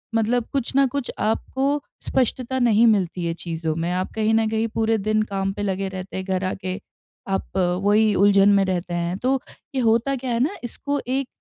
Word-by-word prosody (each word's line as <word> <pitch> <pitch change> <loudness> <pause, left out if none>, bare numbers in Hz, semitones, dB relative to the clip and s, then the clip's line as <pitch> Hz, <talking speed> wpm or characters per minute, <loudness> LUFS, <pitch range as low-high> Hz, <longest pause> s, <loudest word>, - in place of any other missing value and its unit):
मतलब 225 +2 +1
कुछ 275 -4 -1
न 275 0 +5
कुछ 270 0 -3
आपको 270 +6 0 0.2
स्पष्टता 260 0 0
नहीं 235 -2 +4
मिलती 185 -5 +1
है 165 - 0
चीज़ों 165 -1 -3
में, 165 +2 -1
आप 185 +1 -2
कहीं 220 0 +1
न 225 0 +3
कहीं 220 +1 0
पूरे 225 0 +1
दिन 215 +1 +1
काम 195 0 -1
पे 205 - -6
लगे 195 -1 -1
रहते 190 0 -6
हैं, 190 - -4
घर 190 -1 -1
आके 185 0 -3 0.5
आप 195 -1 -3 0.3
वही 210 +1 +4
उलझन 200 0 +5
में 200 -1 +4
रहते 180 -1 -2
हैं। 175 +1 -1
तो 265 +5 +1 0.4
ये 260 - +1
होता 235 +4 +2
क्या 255 -1 -4
है 230 - 0
ना, 335 +9 -1
इसको 285 +4 -3
एक 265 +1 -1
215 Hz, 200 wpm, -23 LUFS, 190-245 Hz, 0.5 s, न